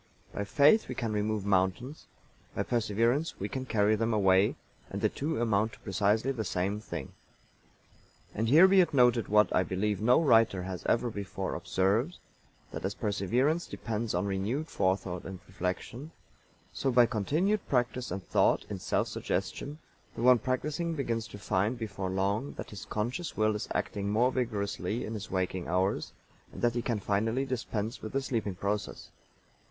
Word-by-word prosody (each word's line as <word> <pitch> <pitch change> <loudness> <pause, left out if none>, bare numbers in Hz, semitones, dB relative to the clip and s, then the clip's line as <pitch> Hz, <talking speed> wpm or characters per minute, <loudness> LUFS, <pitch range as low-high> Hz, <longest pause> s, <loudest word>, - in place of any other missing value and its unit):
By 100 - -3
faith 145 - +4
we - - -5
can 115 -4 -2
remove 105 -1 -1
mountains, 100 - 0 0.5
by - - 0
perseverance 115 +6 0
we 100 - -2
can 130 +3 -5
carry 105 -2 +3
them 115 +1 0
away, 95 -1 +4 0.3
and - - -4
the - - +2
two 150 0 -3
amount 110 -1 +1
to - - -13
precisely 105 +5 +1
the 120 -5 -3
same 95 +2 -1
thing. 85 -10 -6 1.2
And 110 +2 -1
here 160 +8 +8
be 190 0 +6
it 170 -5 0
noted 125 -3 +4
what, 105 0 +4
I - - +5
believe, 95 +3 -1
no 120 +6 +5
writer 115 - +4
has 95 -1 -5
ever 120 +1 +1
before 100 -2 -4
observed, 110 - 0 0.5
that - - -6
as 95 +2 -2
perseverance 120 - 0
depends 110 -2 -3
on 90 +3 0
renewed 105 +11 -2
forethought 95 -2 -1
and 95 -1 -7
reflection, 100 - -4 0.6
so 135 - -1
by 120 -1 +6
continued 155 - 0
practice 125 -1 0
and 95 +1 -4
thought, - - +2
in 100 - -4
self - - 0
suggestion, 145 +2 -3 0.4
the - - -4
one 125 -1 +7
practicing 150 +8 -2
begins 115 -6 -2
to - - -10
find 105 +3 0
before 100 -4 -4
long 100 +8 -1
that - - -8
his 100 -4 -8
conscious 120 +11 -3
will 110 0 +3
is 105 - -4
acting 100 -1 -2
more 120 +5 +3
vigorously 105 -4 -2
in 110 - -5
his 110 -1 -6
waking 95 -1 -2
hours, 95 +3 0 0.4
and - - -9
that 120 -1 +3
he 120 - -1
can 115 -2 -1
finally 110 +7 0
dispense 115 -3 -3
with 110 - -7
the 135 - +1
sleeping 110 -7 -2
process. 100 +2 -3
110 Hz, 170 wpm, -30 LUFS, 100-125 Hz, 1.2 s, here